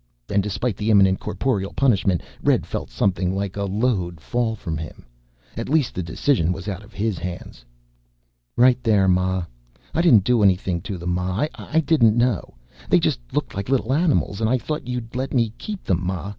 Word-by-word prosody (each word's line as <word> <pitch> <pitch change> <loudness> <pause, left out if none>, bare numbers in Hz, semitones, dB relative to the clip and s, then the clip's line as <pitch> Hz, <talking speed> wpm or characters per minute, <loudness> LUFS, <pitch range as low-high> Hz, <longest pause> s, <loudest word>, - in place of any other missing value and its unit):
And 100 - +2
despite 105 +2 -2
the 105 +1 -2
imminent 95 -3 +5
corporal 105 -7 -2
punishment, 100 - +2 0.2
Red - - +2
felt - - -5
something 95 -1 0
like 100 -1 -3
a 100 0 -2
load 95 -5 -1
fall 115 +5 -1
from 85 -6 -5
him. 80 -5 -8 0.5
At - - -4
least 150 -4 +2
the 90 - -3
decision 85 - +1
was 95 +2 -5
out 100 -1 -4
of 105 - -16
his 105 -2 -2
hands. 90 -8 -7 0.9
"Right 125 +1 +5
there, 105 -5 +3
ma. 95 0 +1 0.5
I 165 - +2
didn't 120 - +6
do 120 +2 +2
anything 95 -3 +2
to 100 - -3
them, 85 +1 -3
ma. 90 +7 0
I 160 +1 -1
didn't 130 -8 +3
know. 120 - 0 0.3
They - - +5
just - - 0
looked - - -2
like 100 +4 -4
little 130 -2 +1
animals 145 - +1
and 110 - +2
I 130 - +3
thought 150 +3 -4
you'd 125 -2 -5
let 130 +2 -2
me 115 -3 +1
keep 210 -3 -6
them, 90 -1 0
ma. 95 +2 -3
100 Hz, 190 wpm, -22 LUFS, 95-125 Hz, 0.9 s, didn't